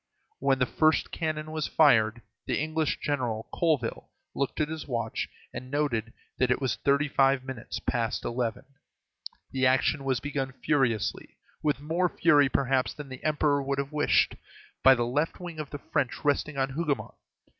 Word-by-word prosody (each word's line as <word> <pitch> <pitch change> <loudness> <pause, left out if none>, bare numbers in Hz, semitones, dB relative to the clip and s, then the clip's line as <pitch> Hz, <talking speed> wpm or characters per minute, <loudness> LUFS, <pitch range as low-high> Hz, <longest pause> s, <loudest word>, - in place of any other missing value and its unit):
When 135 0 +2
the 125 - +2
first 155 +4 +2
cannon 155 -1 -3
was 155 -1 -2
fired, 120 -6 +4 0.2
the - - 0
English 155 +1 0
general, 120 -6 -2
Colville, 150 -9 0 0.2
looked 140 - -2
at 155 - +2
his 160 0 -6
watch, 120 -4 -2 0.2
and 130 - -7
noted 130 -6 -1 0.3
that 130 - +3
it 125 - +2
was 130 -4 0
thirty 140 +1 +2
five 135 -1 +3
minutes 130 -3 -6
past 120 -2 -2
eleven. 120 -2 -2 0.9
The 130 -1 +2
action 135 +2 +2
was 130 -2 0
begun 135 -1 -3
furiously, 130 -6 0 0.2
with 150 -2 0
more 170 +4 +1
fury, 145 -6 +4
perhaps, 130 -1 +1
than 145 -2 -8
the 130 -1 -9
Emperor 150 -2 +2
would 140 0 -2
have 140 +1 -2
wished, 150 -1 +3 0.5
by 135 0 +8
the 120 -1 0
left 145 +7 -1
wing 175 -3 -7
of 150 -3 -5
the 145 - -5
French 145 -1 -2
resting 145 0 +1
on 135 0 +1
Hougomont. 145 -5 -2
140 Hz, 165 wpm, -28 LUFS, 130-150 Hz, 0.9 s, by